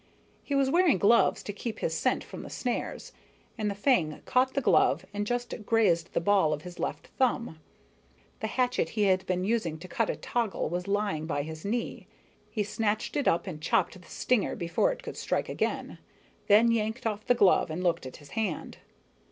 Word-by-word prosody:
He 285 - -3
was 270 -1 +3
wearing 345 - +4
gloves 210 +6 +4
to 205 - -5
keep 220 +2 -5
his - - -2
scent - - +1
from - - -9
the - - -9
snares, 245 -2 -3 0.4
and 215 -3 -1
the 200 - -3
fang 195 - +2
caught 255 +1 +2
the - - +3
glove 175 - +3
and 205 0 -2
just 245 +1 -2
grazed 200 -7 +2
the - - +2
ball 185 -4 +3
of 150 0 -5
his 180 -1 -10
left - - -4
thumb. 240 -9 +1 0.8
The - - -2
hatchet 250 -1 0
he 210 - +3
had 190 -1 +3
been 185 0 0
using 190 -7 0
to 175 +3 -10
cut 225 +5 -1
a - - 0
toggle 235 -4 -2
was 180 +2 -3
lying 200 -6 -1
by 145 -3 -1
his 160 +1 -8
knee. 230 +4 -3 0.4
He 215 - -1
snatched 215 +1 -1
it 285 - 0
up 165 - +2
and 160 -6 -6
chopped 180 +2 0
the - - -18
stinger 250 -5 0
before 175 - +1
it - - -7
could - - -7
strike - - -1
again, - - -2 0.5
then 220 +3 +6
yanked 225 +2 -1
off 215 -1 -2
the 245 - +5
glove 195 -5 +4
and 165 +4 -3
looked 170 -6 0
at 130 - -10
his 145 -2 -16
hand. 210 -8 -3
205 Hz, 200 wpm, -29 LUFS, 175-235 Hz, 0.8 s, then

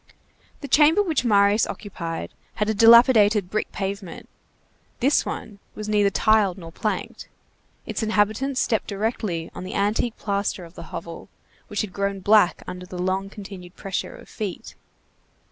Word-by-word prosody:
The 285 - -5
chamber 310 +8 +5
which 320 -9 0
Marius 205 -2 +4
occupied 170 -5 -6 0.2
had 210 - -1
a 220 - +1
dilapidated 220 -3 +6
brick 215 - -2
pavement; 195 -2 -5 0.7
this 275 +4 +2
one 205 -2 -6 0.2
was 215 0 -6
neither 205 -1 +3
tiled 205 -2 +2
nor 165 -3 -10
planked; 215 +5 -4 0.6
its - - -4
inhabitants 220 +5 +1
stepped 220 - 0
directly 200 -5 -3
on - - -7
the 185 - -6
antique 210 +3 0
plaster 200 -3 -2
of 165 - -15
the - - -10
hovel, 170 0 -8 0.4
which 205 - -2
had 205 -3 -5
grown 200 0 -2
black 205 -1 +3
under 180 0 -8
the 180 - -8
long 190 +2 -1
continued 195 -3 -10
pressure 195 -2 -4
of - - -14
feet. 205 -5 -6
205 Hz, 150 wpm, -23 LUFS, 190-220 Hz, 0.7 s, dilapidated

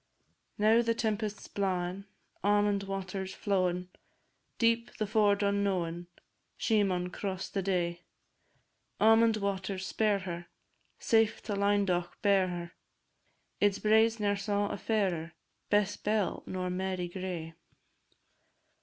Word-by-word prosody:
Now 220 +3 +5
the 230 -1 0
tempest's 215 -2 -2
blawin', 185 -1 -2 0.4
Almond 205 0 +3
water 195 0 -4
's 190 - -8
flowin', 180 -3 0 0.7
Deep 230 0 +2
and 215 - 0
ford 205 -1 +3
unknowin', 185 -4 0 0.5
She 220 -2 +2
maun 180 -2 0
cross 190 0 -4
the 195 - -2
day. 175 -2 -1 1.0
Almond 225 0 +5
waters, 195 -1 -2
spare 210 0 +1
her, 175 -3 -6 0.5
Safe 225 -1 +2
to 215 - -3
Lynedoch 200 -3 +1
bear 195 -2 +4
her! 175 -1 -5 0.9
Its 205 -1 +3
braes 220 +1 +3
ne'er 205 -1 +1
saw 205 0 0
a - - -3
fairer, 180 -7 -1 0.4
Bess 205 -1 +2
Bell 210 -2 0
nor 185 -1 -3
Mary 185 -1 -2
Gray. 175 -3 -5
200 Hz, 120 wpm, -31 LUFS, 185-210 Hz, 1.0 s, Now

